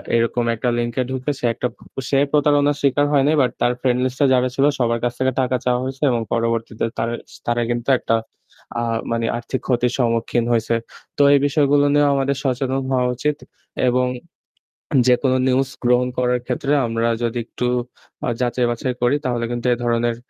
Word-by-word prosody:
এরকম 115 +1 +1
একটা 120 +2 -1
লিঙ্কে 120 +1 -1
ঢুকে 130 +2 -2
সে - - -2
একটা 125 - -2 0.3
প - - -40
সে 135 - +2
প্রতারণার 145 -1 +3
শিকার 145 +1 +2
হয় 140 -2 +4
নাই, 155 - +3
বাট 125 -2 +2
তার 120 - +3
ফ্রেন্ডলিস্ট 125 0 0
এ - - +6
যারা 125 0 +3
ছিল 135 - +3
সবার 115 -1 +1
কাছ 120 - 0
থেকে 130 0 +2
টাকা 130 0 0
চাওয়া 125 -1 +2
হয়েছে 130 +2 -5
এবং 120 -2 0
পরবর্তীতে 115 -1 -1
তার 115 +1 -1 0.4
তারা 120 0 0
কিন্তু 120 +1 -2
একটা 115 - 0 0.7
আ - - -1 0.3
মানে 115 0 0
আর্থিক 125 +2 -4
ক্ষতির 125 -1 +1
সম্মুখীন 115 -1 +1
হইছে। 115 0 +1 0.4
তো - - +2
এই 140 - +5
বিষয়গুলো 145 0 +3
নিয়েও 145 0 +4
আমাদের 140 0 0
সচেতন 135 0 -1
হওয়া 125 -1 +2
উচিত। 150 +4 -1 0.5
এবং 125 +1 +1 1.0
যেকোনো 130 +1 +3
নিউজ 130 +1 +2
গ্রহণ 125 +1 +3
করার 125 0 +1
ক্ষেত্রে 135 +3 -1
আমরা 115 0 0 0.2
যদি 120 +1 -1
একটু 125 - -4 0.6
আ - - +1
যাচাই 125 0 +1
বাচাই 125 +2 -2
করি 120 +3 +3
তাহলে 120 -2 -1
কিন্তু 120 +1 -2
এ - - 0
ধরনের 120 0 +1
125 Hz, 180 wpm, -20 LUFS, 120-135 Hz, 1.0 s, এ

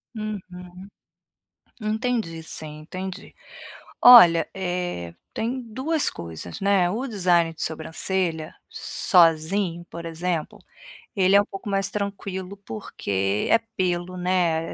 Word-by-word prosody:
Uhum. 215 -1 -4 1.4
Entendi 215 -6 -2
sim, 155 -1 -6
entendi. 185 +4 -7 0.7
Olha, 175 -10 +9
eh 175 - -3 0.2
tem 240 +4 -2
2 260 +7 -1
coisas, 85 - -8
né, 195 -3 +3
o 230 +9 -2
design 175 -7 +2
de 160 - -16
sobrancelha, 160 +1 -2 0.2
sozinho, 170 0 +2
por 170 0 -7
exemplo, 170 +4 -3 0.6
ele 190 0 +4
é - - +8
um - - 0
pouco 195 +1 -7
mais 195 0 0
tranquilo 200 -2 -4
porque 100 -2 -2
é - - +7 0.2
pelo, 180 0 -1
né, 175 -3 0
180 Hz, 110 wpm, -24 LUFS, 165-200 Hz, 1.4 s, Olha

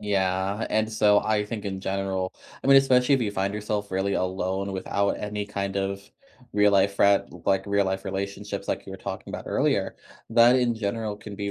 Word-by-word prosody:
Yeah, 95 +1 0
and 110 0 +1
so 105 -1 +4
I 105 -1 0
think 105 0 -6
in 95 -1 -4
general 95 -1 -2 0.3
I - - -4
mean, 135 0 +7
especially 135 0 +5
if 130 - +1
you 105 - -1
find 100 0 -2
yourself 105 -1 -3
really 95 +1 0
alone 95 +1 -2
without 100 +1 0
any 105 0 -4
kind 100 -1 -3
of 100 0 -2 0.5
real 105 0 +4
life 100 0 +3
frien 100 0 +4 0.2
like, 95 -1 +2
real 100 0 +2
life 95 0 -2
relationships 100 +1 -4
like - - -3
you - - -8
were - - -6
talking - - -7
about - - -6
earlier, - - 0 0.4
that 120 +2 +6
in 120 -2 +2
general 110 0 -3
can 105 -1 -10
be 100 0 -3
100 Hz, 200 wpm, -25 LUFS, 95-105 Hz, 0.5 s, mean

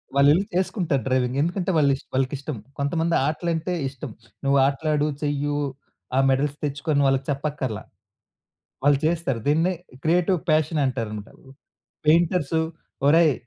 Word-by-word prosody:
వాళ్ళెళ్లి 145 +7 +5
చేసుకుంటారు 180 - 0
డ్రైవింగ్. 130 0 +1
ఎందుకంటే 175 +3 0
వాళ్ళిష్ 140 -3 +2
వాళ్ళకిష్టం. 135 +1 -2 0.2
కొంతమంది 165 +4 0
ఆటలంటే 170 +2 -1 0.2
ఇష్టం. 135 -2 -8 0.3
నువ్వు 140 0 +4
ఆటలాడు 150 +2 +1 0.2
చెయ్యు 145 0 -1 0.6
ఆ - - +5
మెడల్స్ 140 +2 +1
తెచ్చుకొ 145 +2 -4
అని 140 0 +3
వాళ్ళకి 135 0 +1
చెప్పక్కర్లా. 140 -5 -3 1.0
వాళ్ళు 145 0 +5
చేస్తారు 160 -7 0
దీన్నే 165 +5 +3 0.3
క్రియేటివ్ 175 +2 +2
ప్యాషన్ 155 0 +2
అంటారన్నమాట. 110 -5 -4 0.7
పెయింటర్స్, 165 -1 +3 0.5
ఒరేయ్ 160 0 +5
145 Hz, 115 wpm, -24 LUFS, 135-165 Hz, 1.0 s, వాళ్ళెళ్లి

